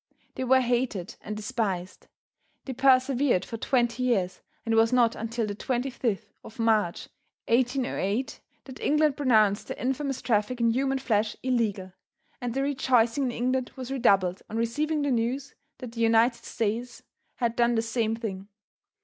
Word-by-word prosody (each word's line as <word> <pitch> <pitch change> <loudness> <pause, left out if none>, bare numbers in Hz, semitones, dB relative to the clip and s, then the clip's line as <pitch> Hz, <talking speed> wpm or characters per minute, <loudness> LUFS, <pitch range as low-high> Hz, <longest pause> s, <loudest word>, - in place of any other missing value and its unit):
They - - -4
were 260 +1 +4
hated 240 -7 -1
and 210 0 -6
despised. 205 -6 -3 0.6
They 265 - -4
persevered 255 -4 +3
for 230 - -6
twenty 240 0 0
years, 205 -8 0 0.2
and 225 - 0
it - - +3
was 225 0 +4
not 245 -2 +3
until 225 +1 -2
the 205 - -4
25th 245 -1 -2 0.2
of 220 - -12
March, 220 -6 +1 0.4
1808, 245 -2 0 0.2
that 260 -2 -11
England 300 -1 +2
pronounced 220 -8 +3
the - - -6
infamous 270 +1 -2
traffic 225 +2 0
in 230 -1 +3
human 270 +3 0
flesh 215 -5 0
illegal, 215 -7 -1 0.5
and 245 -1 -3
the 270 - +1
rejoicing 260 -2 +2
in 250 - -1
England 255 +2 -1
was 260 -1 -7
redoubled 195 -8 +2
on 225 - -4
receiving 295 +7 0
the 285 - 0
news 250 +4 -1 0.2
that 250 -3 -8
the 230 0 -5
United 230 +1 +3
States 230 +3 -3 0.3
had 235 -2 -1
done 240 0 +2
the 225 - +1
same 225 -1 -1
thing. 200 -4 -6
235 Hz, 160 wpm, -27 LUFS, 220-260 Hz, 0.6 s, were